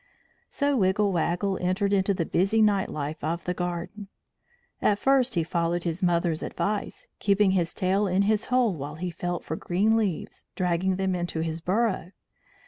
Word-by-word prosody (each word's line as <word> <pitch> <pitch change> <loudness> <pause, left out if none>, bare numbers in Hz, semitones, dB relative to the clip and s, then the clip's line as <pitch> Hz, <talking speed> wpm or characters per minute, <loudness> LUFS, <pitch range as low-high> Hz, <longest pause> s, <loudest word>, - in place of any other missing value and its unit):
So 285 -1 0
Wiggle 200 0 +2
Waggle 180 +3 0
entered 190 +3 +1
into 195 0 +2
the 165 - -1
busy 195 +7 +1
night 205 -3 +3
life 150 +1 -5
of 165 +3 -2
the 180 - -1
garden. 180 +4 -4 0.7
At 205 - +3
first 265 0 +2
he 170 - +2
followed 170 +1 -1
his 170 +2 -3
mother's 170 -2 +1
advice, 205 0 -3
keeping 200 -1 +3
his 175 -3 +1
tail 195 +2 +1
in 190 +2 +2
his 215 +1 +1
hole 250 -4 +2
while 150 -1 -6
he 175 +2 -4
felt 175 +1 -4
for 160 - -4
green 200 +7 +1
leaves, 205 -7 -2
dragging 180 +1 +1
them 190 0 0
into 175 -2 -2
his 165 0 -3
burrow. 190 -1 0
185 Hz, 170 wpm, -26 LUFS, 170-205 Hz, 0.7 s, night